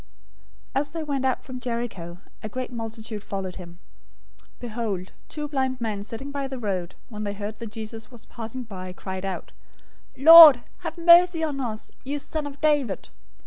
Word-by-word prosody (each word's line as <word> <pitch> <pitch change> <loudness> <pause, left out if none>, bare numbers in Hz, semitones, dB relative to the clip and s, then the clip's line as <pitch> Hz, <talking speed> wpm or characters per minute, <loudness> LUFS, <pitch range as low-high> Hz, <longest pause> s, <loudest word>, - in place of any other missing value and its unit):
020:029 270 - +2
As 290 - -5
they 325 +1 -5
went 280 -3 -2
out 260 - 0
from 255 -1 -8
Jericho, 230 -8 -5 0.2
a 215 - -5
great 255 +3 -5
multitude 225 -2 -6
followed 190 -2 -5
him. 175 -2 -10 0.6
020:030 - - -24
Behold, 220 -6 -4 0.2
two 300 -1 -4
blind 265 -3 -1
men 215 -4 -3
sitting 230 +7 -7
by 280 -1 -3
the 265 -1 -6
road, 190 -6 -3
when 215 -2 -6
they 205 -1 -3
heard 210 +1 -6
that 225 -2 -8
Jesus 225 +1 -7
was 240 -3 -14
passing 235 +2 -7
by, 185 -5 -8
cried 190 +1 -6
out, 190 -1 -5 0.7
"Lord, 305 -3 +10 0.2
have - - -6
mercy 340 0 +6
on 295 -3 -2
us, 220 -4 -5
you 280 +2 -3
son 295 +1 -3
of 285 0 -10
David!" 290 -10 +1
235 Hz, 180 wpm, -25 LUFS, 210-280 Hz, 0.7 s, Lord